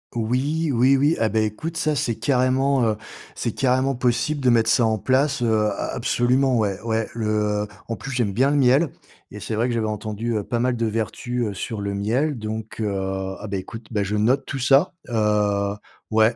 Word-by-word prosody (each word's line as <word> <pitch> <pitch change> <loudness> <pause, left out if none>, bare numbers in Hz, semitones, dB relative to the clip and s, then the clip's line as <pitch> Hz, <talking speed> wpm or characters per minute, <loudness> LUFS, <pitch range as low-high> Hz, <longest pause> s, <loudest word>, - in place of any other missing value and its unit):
Oui, 135 +8 0
oui, 130 +3 +4
oui! 145 +4 +3
Ah, 115 - +3
bah 110 - +1
écoute, 110 +10 -2
ça, 155 -2 0
c'est 120 -3 0
carrément, 130 +1 +2
heu, 110 -1 +1 0.4
c'est 115 - -3
carrément 130 +1 +1
possible 125 +4 0
de 130 - +3
mettre 115 -1 +3
ça 120 -1 +4
en 110 -1 +1
place. 135 +3 +1
Heu, 110 -2 +2
a - - -3
absolument, 125 +2 +2
ouais, 100 -3 0
ouais. 110 -1 -1
Le, 115 -2 -2 0.4
heu - - -6 0.2
en 115 - -3
plus, 135 - -7
j'aime 120 -6 0
bien 135 +6 +3
le 145 - +2
miel 135 +4 +4 0.4
et 105 - -8
c'est 110 +2 -4
vrai 115 +3 +1
que - - -1
j'avais 110 -2 0
entendu, 110 +2 -3
heu, 105 - -2
pas 120 +3 -2
mal 125 0 +1
de 115 - 0
vertus, 115 +3 -2
heu, 100 - -4
sur 110 +1 -4
le 100 0 -2
miel. 125 +8 0
Donc, 110 0 -6
heu 105 -2 -1 0.5
ah 110 - -7
beh 100 - -2
écoute, 110 +4 -8
bah, 105 -3 0
je 100 +2 -2
note 115 +6 +2
tout 135 - -4
ça. 135 +8 +4 0.2
Heu, 105 -2 +1 0.4
ouais, 110 +2 +4
115 Hz, 215 wpm, -23 LUFS, 110-130 Hz, 0.5 s, oui